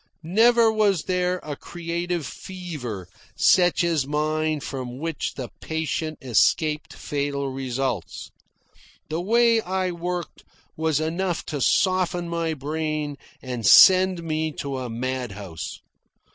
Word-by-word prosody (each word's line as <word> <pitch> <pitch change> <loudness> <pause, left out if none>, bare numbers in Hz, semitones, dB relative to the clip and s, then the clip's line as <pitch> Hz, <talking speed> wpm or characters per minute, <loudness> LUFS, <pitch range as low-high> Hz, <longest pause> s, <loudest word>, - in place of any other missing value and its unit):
Never 225 +6 +4
was 205 -6 +2
there 180 0 0
a 150 -1 -5
creative 170 0 -4
fever 145 - -7 0.3
such 175 -1 +4
as 160 -6 +1
mine 155 +1 0
from 130 -3 -5
which 160 +2 -3
the 125 -4 -5
patient 160 0 -3
escaped 150 - +2
fatal 140 -1 -3
results. 130 -5 -3 0.8
The 160 +2 -2
way 230 +3 +4
I 185 -1 -1
worked 175 0 -5 0.3
was 160 -2 +1
enough 170 +3 -2
to 145 - -2
soften 180 +2 +2
my 165 -1 -1
brain 155 0 -3 0.3
and 125 -3 -4
send 185 - +7
me 155 -1 -1
to 140 -2 -4
a 125 -1 -5
mad 125 -1 -3
house. 95 -5 -7
155 Hz, 120 wpm, -24 LUFS, 135-180 Hz, 0.8 s, send